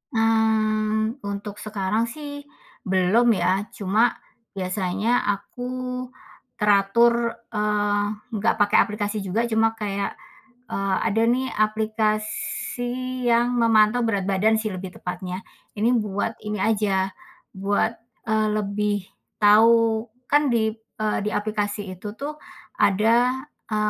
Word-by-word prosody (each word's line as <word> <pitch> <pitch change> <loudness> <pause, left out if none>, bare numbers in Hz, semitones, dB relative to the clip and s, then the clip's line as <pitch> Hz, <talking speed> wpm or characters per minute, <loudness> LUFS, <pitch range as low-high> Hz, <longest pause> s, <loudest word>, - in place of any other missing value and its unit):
Mmm. 220 +1 +1
Untuk 200 0 -6
sekarang 215 +2 -1
sih, 285 +2 -8 0.4
belum 190 +6 +3
ya, 185 +3 +1
cuma 215 +4 +2 0.4
biasanya 195 +4 0 0.2
aku 245 +5 -8 0.9
teratur, 230 +4 +3 0.2
eee, 210 -1 +1 0.3
nggak 220 +1 +1
pakai 205 0 +3
aplikasi 210 0 -2
juga, 195 +5 -1
cuma 225 0 +2
kayak 200 -2 -3 0.6
e - - -2 0.3
ada 225 +1 +1
nih, 255 +2 +1
aplikasi 220 +4 -1
yang 240 +1 +3
memantau 225 0 +4
berat 200 -4 0
badan 205 +3 +3
sih, 215 -2 -2
lebih 185 0 -7
tepatnya. 180 +1 -5 0.4
Ini 220 +3 +2
buat 205 +2 -2
ini 210 -1 -3
aja, 195 -3 +1 0.4
buat 200 +3 +1 0.4
e - - -1 0.2
lebih 210 0 0 0.5
tahu. 225 +2 +5 0.2
Kan 290 0 +4
di, 220 -2 +2
e 220 -1 -8 0.2
di 210 - 0
aplikasi 205 -2 -2
itu 195 +4 -9
tuh, 295 +2 -4 0.4
ada 235 +6 +3 0.3
e - - 0
215 Hz, 115 wpm, -24 LUFS, 200-230 Hz, 0.9 s, tahu